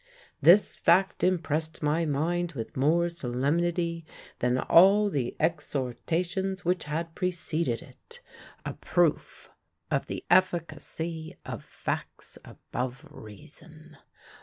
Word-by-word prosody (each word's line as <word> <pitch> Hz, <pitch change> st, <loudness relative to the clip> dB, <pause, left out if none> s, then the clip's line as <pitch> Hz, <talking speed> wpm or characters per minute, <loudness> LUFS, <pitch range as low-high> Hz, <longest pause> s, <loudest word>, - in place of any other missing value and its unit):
This 190 Hz, +5 st, +6 dB
fact 185 Hz, +3 st, +2 dB
impressed 160 Hz, -3 st, 0 dB
my 155 Hz, +3 st, +1 dB
mind 170 Hz, +4 st, -1 dB
with 115 Hz, -5 st, -6 dB
more 160 Hz, +6 st, +3 dB
solemnity 170 Hz, +4 st, -1 dB, 0.4 s
than 125 Hz, +1 st, +1 dB
all 200 Hz, +8 st, +5 dB
the 130 Hz, -6 st, -2 dB
exhortations 170 Hz, +5 st, -2 dB
which 180 Hz, 0 st, 0 dB
had 165 Hz, +2 st, -3 dB
preceded 165 Hz, -7 st, -2 dB
it 170 Hz, -, -15 dB, 0.5 s
a -, -, -3 dB
proof -, -, -1 dB, 0.4 s
of -, -, 0 dB
the -, -, -6 dB
efficacy 165 Hz, -2 st, 0 dB
of -, -, -6 dB
facts -, -, -5 dB
above 130 Hz, +4 st, -6 dB
reason. 155 Hz, -, -13 dB
165 Hz, 105 wpm, -28 LUFS, 145-175 Hz, 0.5 s, This